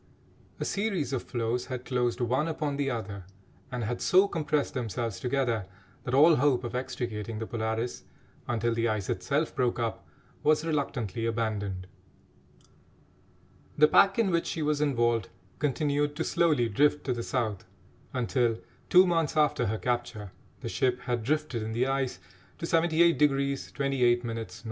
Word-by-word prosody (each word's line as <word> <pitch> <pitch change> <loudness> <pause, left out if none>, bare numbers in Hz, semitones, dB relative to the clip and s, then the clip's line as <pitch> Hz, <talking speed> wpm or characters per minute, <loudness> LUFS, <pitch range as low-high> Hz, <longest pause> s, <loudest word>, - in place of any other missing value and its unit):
A - - -2
series 195 - -1
of 130 - 0
floes 120 +1 -2
had 125 -2 -5
closed 125 -1 0
one 130 +6 +1
upon 150 -3 -2
the 140 -1 0
other, 105 -6 -5 0.5
and 125 -1 -3
had 120 +3 -3
so 190 +2 +5
compressed 150 -5 -1
themselves 115 -4 -3
together, 120 -5 0 0.4
that 125 - 0
all 155 +3 +7
hope 130 -2 +2
of 120 - -5
extricating 115 -4 -4
the 110 - -3
Polaris 110 +1 -3 0.4
until 120 -1 0
the 115 0 +1
ice 105 -4 -1
itself 140 - -1
broke 125 -4 +1
up 115 -2 -2 0.4
was 155 +1 +3
reluctantly 125 - -2
abandoned. 105 -5 -2 1.9
The 150 +1 +7
pack 195 +5 +5
in 220 -5 +2
which 170 -1 +1
she 160 - -2
was 150 0 +1
involved 120 -7 +1 0.3
continued 145 +1 0
to 165 - -1
slowly 160 -10 +2
drift 145 +7 +2
to 130 - 0
the 120 - -4
South 115 -6 -2 0.5
until, 120 -2 +1 0.3
two 185 +1 +7
months 165 -3 0
after 150 -5 +2
her 110 - -1
capture, 120 -5 -3 0.3
the - - -4
ship 125 -1 0
had 120 -2 -2
drifted 145 -1 -1
in 110 +1 -4
the 120 +3 +1
ice 135 -1 -1 0.4
to - - -4
78° 160 -5 +2
28' 125 -4 +1
N. 115 -1 -4
125 Hz, 155 wpm, -28 LUFS, 115-150 Hz, 1.9 s, all